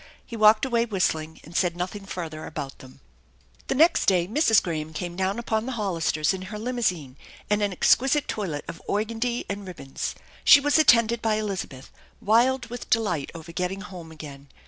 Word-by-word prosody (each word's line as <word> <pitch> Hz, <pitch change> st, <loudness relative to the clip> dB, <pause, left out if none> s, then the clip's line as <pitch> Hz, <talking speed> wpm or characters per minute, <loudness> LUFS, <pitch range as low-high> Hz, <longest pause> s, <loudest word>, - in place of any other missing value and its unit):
He 235 Hz, -, -8 dB
walked 215 Hz, +1 st, +5 dB
away 235 Hz, -3 st, +1 dB
whistling 160 Hz, -7 st, -1 dB
and 165 Hz, +3 st, -13 dB
said 175 Hz, -2 st, +1 dB
nothing 195 Hz, +3 st, -5 dB
further 160 Hz, -4 st, -6 dB
about 135 Hz, -3 st, -7 dB
them. 130 Hz, -1 st, -15 dB, 0.7 s
The -, -, 0 dB
next 325 Hz, +5 st, +4 dB
day 180 Hz, -3 st, +3 dB
Mrs. 225 Hz, -, +4 dB
Graham 160 Hz, -2 st, -4 dB
came 175 Hz, +1 st, -5 dB
down 190 Hz, +3 st, -1 dB
upon 230 Hz, -1 st, -2 dB
the 260 Hz, -, -3 dB
Hollisters 170 Hz, -7 st, 0 dB
in 190 Hz, -, -5 dB
her 210 Hz, -, -6 dB
limousine, 210 Hz, -, -2 dB, 0.3 s
and 210 Hz, 0 st, +2 dB
an 205 Hz, -1 st, +1 dB
exquisite 270 Hz, -, +3 dB
toilet 170 Hz, -9 st, -3 dB
of 165 Hz, -, -8 dB
organdie 230 Hz, +3 st, -1 dB
and 200 Hz, -1 st, -5 dB
ribbons. 140 Hz, -7 st, -5 dB, 0.3 s
She 290 Hz, -, +9 dB
was 290 Hz, +2 st, +2 dB
attended 230 Hz, -5 st, +4 dB
by 220 Hz, -1 st, +1 dB
Elizabeth, 195 Hz, -11 st, -5 dB, 0.3 s
wild 245 Hz, +4 st, +3 dB
with 245 Hz, -, -7 dB
delight 180 Hz, -11 st, 0 dB
over 165 Hz, 0 st, -9 dB
getting 180 Hz, +3 st, -3 dB
home 180 Hz, -5 st, -10 dB
again. 145 Hz, -3 st, -10 dB
195 Hz, 175 wpm, -25 LUFS, 165-230 Hz, 0.7 s, She